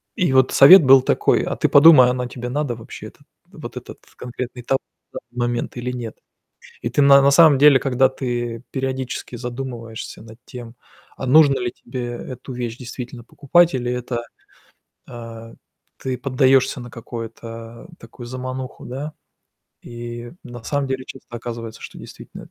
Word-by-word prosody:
и 180 - 0
вот 130 -1 +4
совет 170 +6 +9
был 135 0 +7
такой, - - +2
а, - - -3
ты - - +1
подумай, 145 -4 +8
оно 125 0 -2
тебе 125 0 -7
надо 145 -2 -2
вообще 115 0 -10
это? - - -18 0.3
Вот - - -9
этот - - -10 0.2
конкретный 125 0 -7
тов 135 +3 +1 0.4
да - - -5
в 120 - -18
момент 120 0 -2
или 125 +1 -3
нет? 120 -3 -7 0.6
И - - -3
ты - - +1
на 140 0 +7
на 140 - +4
самом 150 -1 +6
деле, 145 -2 +7
когда 130 -1 +2
ты 120 -3 -4
периодически 130 -2 -4
задумываешься 120 -2 -7
над 110 0 -14
тем, 120 -1 -10 0.4
а, 130 - -5
нужно 140 0 +5
ли 120 -1 -2
тебе 125 -2 -7
эту 125 +2 -8
вещь 120 -2 -5
действительно 125 -1 -8
покупать 170 +6 +2
или 125 -1 -2
это 125 -1 -3 0.9
А, 115 -1 -10 0.4
ты 130 -1 -4
поддаёшься 130 0 +2
на 120 -1 -10
какое-то, 115 +1 -9
такую 115 +1 -12
замануху, 130 +1 -7
да? 140 +5 -6 0.7
И 120 0 -8
на 120 -2 -10
самом 140 +1 -2
деле 130 0 -3
часто 135 - -12
оказывается, 115 -1 -7
что - - -10
действительно - - -12
эт - - -21
125 Hz, 165 wpm, -21 LUFS, 120-135 Hz, 0.9 s, совет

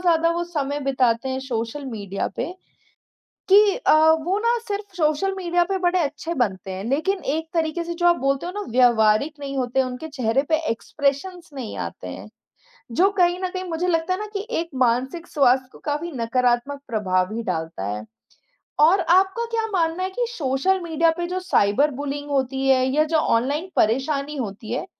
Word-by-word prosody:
ज़्यादा 335 -2 +3
वो 345 +1 -1
समय 290 -4 -3
बिताते 260 -2 +1
हैं 260 - -2
सोशल 250 +2 -4
मीडिया 200 -5 -4
पे 350 - -3 1.0
कि 405 +1 +6
अ, - - +2 0.3
वो 375 +3 +1
ना 470 +2 +2
सिर्फ़ 405 -1 -4
सोशल 320 +5 +1
मीडिया 350 -1 +1
पे 385 +1 -2
बड़े 360 0 +2
अच्छे 315 +2 -3
बनते 195 -7 -1
हैं, 190 +2 -5
लेकिन 315 +11 0 0.2
एक 320 0 -3
तरीके 330 +1 0
से 340 - -4
जो 345 +1 0
आप 345 0 +5
बोलते 275 +4 0
हो 360 - -4
ना 415 - -4
व्यावहारिक 240 +3 +4
नहीं 275 -1 -5
होते, 255 +1 +1
उनके 255 +5 -5
चेहरे 265 -3 0
पे 315 - +5
एक्सप्रेशंस 290 +9 -2
नहीं 250 -5 -6
आते - - -6
हैं, - - -8 0.6
जो 380 +9 +4
कहीं 350 0 +3
न 370 - +1
कहीं 370 0 -4
मुझे 335 +2 -1
लगता 335 +1 +1
है 370 - -4
ना 425 - -3
कि 405 +2 -3
एक 335 - -6
मानसिक 260 +8 -1
स्वास्थ्य 260 -2 +3
को - - -14
काफ़ी 300 +3 -2
नकारात्मक 245 +3 0
प्रभाव 185 -4 0
ही 230 - -3
डालता 160 - -3
है। 105 +1 -4 0.8
और 340 +6 +6
आपका 380 +7 +3
क्या 450 -1 0
मानना 335 0 0
है 375 - -1
कि 485 +5 -1
सोशल 335 - 0
मीडिया 330 0 +2
पे 345 - -2
जो 365 +1 -2
साइबर 290 - +2
बुलींग 290 0 -4
होती 270 0 0
है 260 -1 +4
या 290 +4 +2
जो 320 - +5
ऑनलाइन 290 +6 +1
परेशानी 275 +6 +1
होती 215 -1 -5
है, 270 - -2
290 Hz, 185 wpm, -23 LUFS, 250-350 Hz, 1.0 s, कि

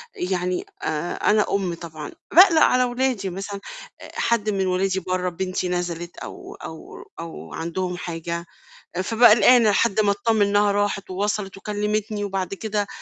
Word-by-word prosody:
يعني 180 0 -2 0.2
آآ 155 +2 -2
أنا 210 0 +2
أم 190 -3 0
طبعًا 160 -3 -8 0.2
باقلق 345 -3 +8
على 255 0 +5
ولادي 245 -5 -1
مثلًا، 195 +2 -6 0.4
آآ - - -10
حد 225 -2 +1
من 195 -2 0
ولادي 190 +1 +1
برّا، 185 0 -1
بنتي 185 +1 -3
نزلت 175 -1 -3
أو - - -9
أو 160 -1 -10 0.2
أو 165 0 -8
عندهم 180 +2 -3
حاجة، 170 0 -4 0.6
فأبقي 230 +3 +6
قلقانة 240 -1 +6
لحد 215 +1 +2
ما 205 -1 +4
أتطمن 220 +1 +1
إنها 205 0 +3
راحت 205 -1 -1
ووصلت 195 +1 -2
وكلمتني 210 +1 -2
وبعد 195 -2 -3
كده 205 0 -2
195 Hz, 145 wpm, -23 LUFS, 180-210 Hz, 0.6 s, باقلق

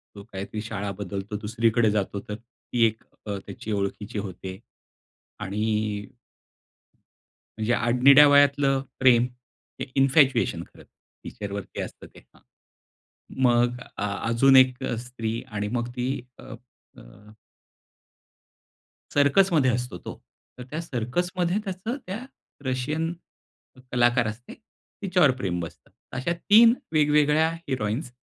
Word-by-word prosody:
तो 100 - -10
काहीतरी 100 +3 -5
शाळा 105 -2 -4
बदलतो 100 +2 -4
दुसरीकडे 115 +1 +2
जातो 100 -1 -1
तर 105 - -3
ती 115 0 -2
एक 110 0 -1 0.2
अ, 100 -2 -3
त्याची 105 +2 -7
ओळखीची 105 +2 -3
होते. 95 -1 -7 0.8
आणि 105 0 -2 1.5
म्हणजे 110 +2 0
आडनिड्या 130 +5 +6
वयातलं 140 -1 +4 0.2
प्रेम, 125 -2 +5 0.6
हे - - -2
इन्फॅच्युएशन 135 0 +3
खरंतर, - - -17 0.4
टीचरवरती 100 -1 -6
असतं - - -8
ते. - - -17
हां. - - -26 1.0
मग 120 0 +3 0.2
अ, - - -3 0.3
अजून 135 +3 +5
एक 130 -1 +4
अ, 120 - -1
स्त्री 115 -2 -4
आणि 105 -1 -3
मग 120 0 -2
ती 125 +2 -2 0.2
अ, - - -12 0.5
अ - - -12 2.1
सर्कसमध्ये 145 -1 +4
असतो 125 -5 -3
तो. - - -10 0.4
तर 125 - -7
त्या 155 +2 -4
सर्कसमध्ये 175 - -1
त्याचं 195 +8 -4
त्या 220 +7 -5 0.4
रशियन 150 +6 -1 0.8
कलाकार 120 -1 +3
असते, 115 +3 -7 0.5
तिच्यावर 180 -7 +4
प्रेम 90 -2 -1
बसतं. 85 -2 -8 0.3
अशा 150 +6 -1
3 220 +7 +6 0.2
वेगवेगळ्या 150 +1 +4 0.2
हिरोइन्स 125 +1 -2
120 Hz, 115 wpm, -25 LUFS, 105-145 Hz, 2.1 s, आडनिड्या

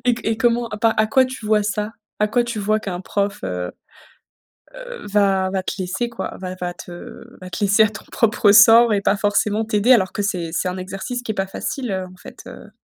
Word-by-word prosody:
Et 245 -1 +3
c - - -8
et 225 0 0
comment, 235 +1 +1
à 215 - -6
pas 225 +1 +3
à 215 - +3
quoi 260 +4 +4
tu 255 -4 -7
vois 210 0 +3
ça? 210 +1 -2 0.3
À 210 - +2
quoi 240 +3 +1
tu 235 -2 -4
vois 215 +1 0
qu'un 180 -4 -5
prof, 200 +1 -2
heu, 90 -1 -3 1.0
heu, - - -9
va 195 -2 +2
va 190 0 -2
te - - -4
laisser, 190 +5 -2
quoi? 235 - -6
Va 185 -1 -5
va 180 -1 -4
te 175 0 -10 0.2
va 185 0 -9
te 175 - -6
laisser 200 +2 +5
à - - +2
ton 205 - -10
propre 215 -2 +3
sort 225 +2 +7
et 205 - +2
pas 200 - +2
forcément 205 +1 +1
t'aider 215 +3 +3
alors 190 -7 +3
que 205 - -2
c'est 180 -4 -2
c'est 175 - -1
un 180 +1 -4
exercice 195 +6 -5
qui 225 - -3
est - - -9
pas 195 -1 -1
facile, 245 +5 -4
heu, 190 -1 -2
en - - -16
fait, - - -13
heu - - -12
210 Hz, 240 wpm, -20 LUFS, 190-225 Hz, 1.0 s, sort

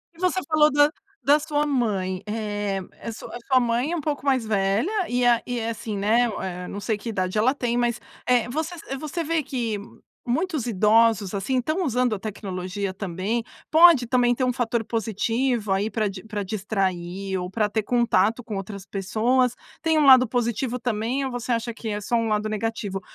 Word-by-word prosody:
E - - -19
você 370 +1 +1
falou 305 -1 +4
da 290 +1 +4 0.3
da 290 +2 +6
sua 295 -1 0
mãe. 200 -9 -1
Eeh 205 -2 -2 0.2
eh, - - -10
a - - -2
su 220 - -9
a - - -7
sua 260 -2 +5
mãe 240 +4 0
é - - +1
um 335 - -2
pouco 290 -1 -3
mais 260 -4 +2
velha 205 - +1 0.2
e 245 0 +1
a 240 -1 +4
e 245 -1 -2
é 225 0 -2
assim, 220 -2 -4
né, 225 +4 +3
eh, 180 -1 -5
não 200 - -6
sei 215 0 -1
que 230 - -6
idade 185 -2 -2
ela 255 +6 +3
tem, 240 -3 -1
mas, 240 -1 +1 0.3
eh, 245 -2 +3
você 320 +6 -3
sa 275 -4 -6
você 310 +4 -4
vê 325 0 0
que 235 -7 -3 0.5
muitos 300 0 -1
idosos, 215 -1 +3
assim, 205 +7 -1
estão 310 +9 -1
usando 250 -5 +1
a - - -7
tecnologia, 190 -1 -4
também? 195 +5 -2 0.3
Pode 320 -6 +7
também 245 0 +3
ter 255 - -1
um 250 - +2
fator 235 -1 -1
positivo 225 +1 -1
aí 195 +3 +1
pra 220 -2 0
di 190 -1 -8
pra 210 -2 -4
distrair 190 -2 -2
ou 180 0 -4
pra 210 +1 0
ter 220 +1 -1
contato 230 -1 +2
com 215 -2 -5
outras 195 0 -7
pessoas. 230 +6 +1 0.3
Tem 320 -1 +2
um 300 - +4
lado 255 -2 +8
positivo 240 +1 -1
também 245 +3 -1
ou 265 - -3
você 245 0 -4
acha 230 0 -2
que 225 - -8
é 210 0 -3
só 225 +4 -1
um 230 -1 0
lado 215 0 0
negativo? 215 -2 -3
230 Hz, 205 wpm, -24 LUFS, 205-255 Hz, 0.5 s, lado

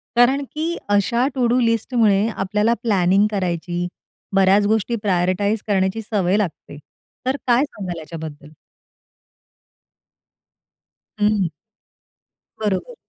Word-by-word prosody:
कारण 255 +4 +4
की 325 +3 -2
अशा 220 +5 +2
टु 255 -2 +1
डू 245 +2 +2
लिस्टमुळे 230 -3 +2
आपल्याला 210 +4 +1
प्लॅनिंग 195 -2 +3
करायची, 175 -2 -2 0.5
बऱ्याच 195 +1 +4
गोष्टी 220 +2 +1
प्रायोरिटाइज 195 +2 +1
करण्याची 195 +1 +1
सवय 200 -3 0
लागते. 180 -7 -4 0.5
तर 260 +1 +1
काय 245 +2 +4
सांगाल 185 - -6
याच्याबद्दल? 155 -2 -8 2.7
हं. 210 -3 +2 1.1
बरोबर. 210 - -2
205 Hz, 95 wpm, -21 LUFS, 185-230 Hz, 2.7 s, कारण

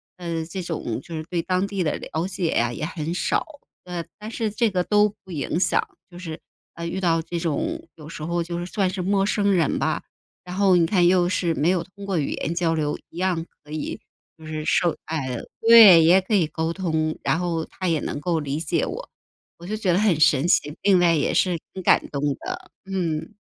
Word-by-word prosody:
呃， 170 -2 -3
这 185 +3 -6
种 155 -10 -3
就 165 - -8
是 155 - -4
对 175 - -1
当 185 +2 0
地 200 -2 -2
的 155 - 0
了 160 +4 -3
解 185 -3 -2
呀， 120 -3 +1
也 - - -6
很 160 0 -3
少， 180 - 0 0.4
呃 175 -2 -5
但 215 +2 -8
是 225 -2 -1
这 215 +1 +1
个 180 -1 +1
都 210 +1 +3
不 190 - -13
影 160 +2 -2
响。 - - +2 0.3
就 175 - -13
是， 165 -3 -7 0.4
呃 170 0 -5
遇 190 +3 -3
到 165 -2 +2
这 170 +1 -5
种 320 - -2
有 150 -2 -12
时 155 -1 -8
候 170 +2 -1
就 170 0 -4
是 175 - -4
算 190 0 0
是 185 0 -4
陌 195 +1 +1
生 200 -1 +1
人 170 -6 +2
吧， - - 0 0.4
然 180 - -7
后 195 -2 +4
你 170 - +4
看 180 0 +3
又 180 0 +4
是 175 -2 0
没 155 +2 +1
有 180 -2 +1
通 200 +3 -12
过 195 -3 -1
语 145 - 0
言 165 - -3
交 170 -2 +1
流 150 -2 -1
一 170 - -14
样 180 -3 0 0.2
可 150 - -15
以 155 -1 -4 0.4
就 160 - -14
是 155 0 -4
受， 170 0 +2
哎， 135 -6 -3 0.2
对， 225 -7 +9
也 175 +4 +6
可 190 +4 -4
以 185 -6 +3
沟 160 +1 -2
通， 160 -3 -1
然 160 - +1
后 170 -2 -2
他 185 -1 -4
也 160 -2 +1
能 145 - -4
够 170 0 0
理 145 -1 -3
解 160 - 0
我。 - - -6 0.5
我 170 - -11
就 215 - -2
觉 210 -4 0
得 175 - +3
很 205 -6 +3
神 150 -1 +4
奇， 150 -2 +1
另 195 -2 +5
外 175 -1 +4
也 150 -3 +1
是 175 -3 +2
挺 190 - -7
感 - - +4
动 140 - -4 0.2
的， - - -7
嗯。 180 -1 -3
175 Hz, 245 characters per minute, -23 LUFS, 160-190 Hz, 0.5 s, 对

